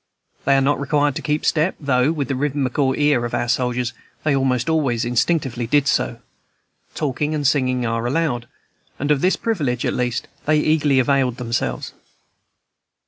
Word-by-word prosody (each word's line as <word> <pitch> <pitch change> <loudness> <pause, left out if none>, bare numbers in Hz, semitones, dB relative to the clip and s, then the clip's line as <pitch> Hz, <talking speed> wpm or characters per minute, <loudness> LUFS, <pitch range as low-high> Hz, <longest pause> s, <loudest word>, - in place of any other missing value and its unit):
They 140 - +4
are - - +3
not 140 +2 +1
required 145 0 +1
to - - -4
keep 150 0 -1
step, 165 +3 +2
though, 140 -1 +2
with 150 -4 -2
the 140 - -1
rhythmical 135 -1 0
ear 145 -4 +2
of 120 - -2
our - - -1
soldiers, 125 0 0 0.3
they 150 -3 +2
almost 130 -2 +1
always 140 -8 +1
instinctively 125 -1 0
did 145 +2 +2
so; 120 -5 +1 0.8
talking 150 +1 -1
and 145 -1 -2
singing 130 -3 +1
are 115 +1 -1
allowed, 125 -4 -1 0.5
and 145 +2 -1
of 140 -2 +2
this 185 - +3
privilege, 145 - -1
at - - 0
least, 125 -1 -2 0.2
they 155 0 +4
eagerly 150 -2 +2
availed 130 -1 +2
themselves. 115 - -3
135 Hz, 165 wpm, -21 LUFS, 125-150 Hz, 0.8 s, They